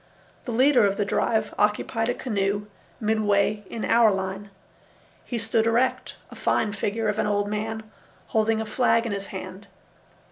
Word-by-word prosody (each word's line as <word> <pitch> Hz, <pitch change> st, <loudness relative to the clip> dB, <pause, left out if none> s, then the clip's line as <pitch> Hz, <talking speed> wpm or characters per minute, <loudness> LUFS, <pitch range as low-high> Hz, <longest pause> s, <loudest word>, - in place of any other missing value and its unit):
The 245 Hz, -, -4 dB
leader 255 Hz, +1 st, +4 dB
of 200 Hz, -1 st, +2 dB
the 205 Hz, -, 0 dB
drive 220 Hz, +2 st, 0 dB
occupied 215 Hz, +2 st, +1 dB
a 245 Hz, -, 0 dB
canoe 205 Hz, -5 st, -1 dB, 0.3 s
midway 210 Hz, -1 st, +1 dB
in 225 Hz, -, -4 dB
our 230 Hz, -1 st, +5 dB
line. 190 Hz, +1 st, -4 dB, 0.8 s
He 240 Hz, -, -3 dB
stood 225 Hz, 0 st, +1 dB
erect, 240 Hz, +3 st, +1 dB, 0.2 s
a -, -, -10 dB
fine 215 Hz, -, 0 dB
figure 210 Hz, +2 st, -2 dB
of 210 Hz, +1 st, -1 dB
an -, -, +1 dB
old 205 Hz, 0 st, 0 dB
man, 220 Hz, +1 st, -3 dB, 0.5 s
holding 220 Hz, 0 st, +2 dB
a 220 Hz, -, -2 dB
flag 230 Hz, +1 st, +2 dB
in 230 Hz, -, -2 dB
his 200 Hz, 0 st, -4 dB
hand. 190 Hz, +1 st, -8 dB
215 Hz, 165 wpm, -25 LUFS, 205-225 Hz, 0.8 s, our